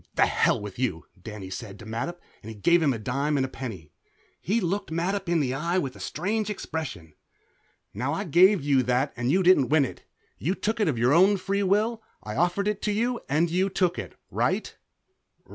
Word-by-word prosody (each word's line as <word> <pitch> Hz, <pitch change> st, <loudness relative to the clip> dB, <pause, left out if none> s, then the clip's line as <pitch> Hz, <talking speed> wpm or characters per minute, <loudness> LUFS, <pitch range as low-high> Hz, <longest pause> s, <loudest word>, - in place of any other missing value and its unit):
"The -, -, +5 dB
hell -, -, +2 dB
with 105 Hz, +1 st, -8 dB
you," 100 Hz, -11 st, -1 dB, 0.2 s
Danny 100 Hz, -2 st, -8 dB
said 100 Hz, +1 st, -7 dB
to 110 Hz, -, -12 dB
Mattup, 115 Hz, +11 st, -4 dB, 0.2 s
and 105 Hz, -1 st, -10 dB
gave 170 Hz, 0 st, +5 dB
him 150 Hz, -3 st, +3 dB
a 120 Hz, -, -2 dB
dime 140 Hz, +7 st, -1 dB
and 135 Hz, -, +1 dB
a -, -, -3 dB
penny. 105 Hz, -, -8 dB, 0.5 s
He 215 Hz, +5 st, 0 dB
looked 195 Hz, +1 st, -2 dB
Mattup 180 Hz, +3 st, -2 dB
in 170 Hz, -1 st, +3 dB
the 130 Hz, -3 st, -1 dB
eye 170 Hz, +6 st, -1 dB
with 135 Hz, -8 st, -2 dB
a -, -, -12 dB
strange 210 Hz, +6 st, -2 dB
expression. 150 Hz, -, -5 dB, 0.8 s
"Now, 125 Hz, +7 st, -2 dB
I 165 Hz, +6 st, -2 dB
gave 185 Hz, +1 st, +5 dB
you 140 Hz, -2 st, +3 dB
that 125 Hz, +3 st, 0 dB
and 125 Hz, +2 st, 0 dB
you 185 Hz, +3 st, +3 dB
didn't 175 Hz, -8 st, +5 dB
win 150 Hz, -2 st, +4 dB
it. -, -, -9 dB, 0.4 s
You 180 Hz, +7 st, 0 dB
took 220 Hz, +3 st, -2 dB
it 210 Hz, -, +2 dB
of 140 Hz, -6 st, 0 dB
your 120 Hz, +4 st, +3 dB
own 190 Hz, +5 st, +5 dB
free 195 Hz, +2 st, -1 dB
will. 215 Hz, +4 st, +1 dB, 0.2 s
I 105 Hz, 0 st, -6 dB
offered 175 Hz, +6 st, +1 dB
it 210 Hz, -1 st, -1 dB
to 210 Hz, -, 0 dB
you 235 Hz, +4 st, 0 dB
and 160 Hz, +4 st, +2 dB
you 185 Hz, +3 st, +1 dB
took 185 Hz, -2 st, 0 dB
it. -, -, -7 dB, 0.2 s
Right?" -, -, -1 dB
160 Hz, 210 wpm, -26 LUFS, 125-190 Hz, 0.8 s, The